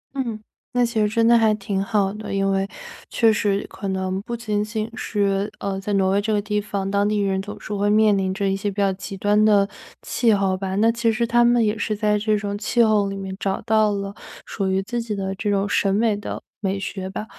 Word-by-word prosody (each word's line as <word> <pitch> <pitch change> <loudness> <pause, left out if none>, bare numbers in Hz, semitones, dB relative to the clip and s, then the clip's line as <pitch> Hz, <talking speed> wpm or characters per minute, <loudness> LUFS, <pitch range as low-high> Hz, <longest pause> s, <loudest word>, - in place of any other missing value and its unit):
嗯， 235 -5 -3 0.3
那 245 -1 +3
其 230 -2 -1
实 210 - +2
真 230 +1 +2
的 235 - +6
还 220 -2 +4
挺 195 -1 -2
好 200 -2 0
的， 215 +1 -7
因 195 0 +1
为 195 0 0 0.4
确 225 -2 +3
实 205 -1 0
可 200 - -7
能 190 0 -2
不 235 +3 -5
仅 210 -3 -1
仅 215 0 -3
是， 200 -3 -1
呃， 195 -1 -3
在 200 +2 -4
挪 190 -1 +2
威 200 +1 +2
这 215 +2 -2
个 210 - +2
地 210 0 -1
方， 200 -1 -3
当 200 +1 +2
地 210 - 0
人 195 -2 0
总 205 +1 -8
是 210 - -6
会 205 0 +1
面 215 0 +4
临 190 -1 0
着 200 +1 -1
一 195 - +1
些 195 +1 -2
比 195 - -8
较 195 -1 +2
极 195 +1 -7
端 205 +2 +3
的 205 -2 +4 0.4
气 235 -2 +2
候 195 -2 +2
吧。 190 0 -3
那 220 +3 +4
其 230 0 +1
实 230 +2 0
他 240 +1 +3
们 240 -1 +4
也 210 0 +1
是 215 0 -2
在 210 0 +1
这 215 0 +1
种 205 -1 -3
气 235 +3 +2
候 210 -3 +3
里 195 - -4
面 190 -1 -5
找 195 -1 -1
到 215 -1 +3
了 200 -1 -3 0.3
属 195 -3 -2
于 190 0 +1
自 235 +4 -3
己 225 -2 -4
的 195 -1 -3
这 200 +2 -3
种 200 0 +1
审 195 -1 +1
美 220 0 +2
的 205 - -6 0.2
美 195 -2 -1
学 190 -1 -5
吧。 210 +2 -5
205 Hz, 265 characters per minute, -22 LUFS, 195-215 Hz, 0.4 s, 的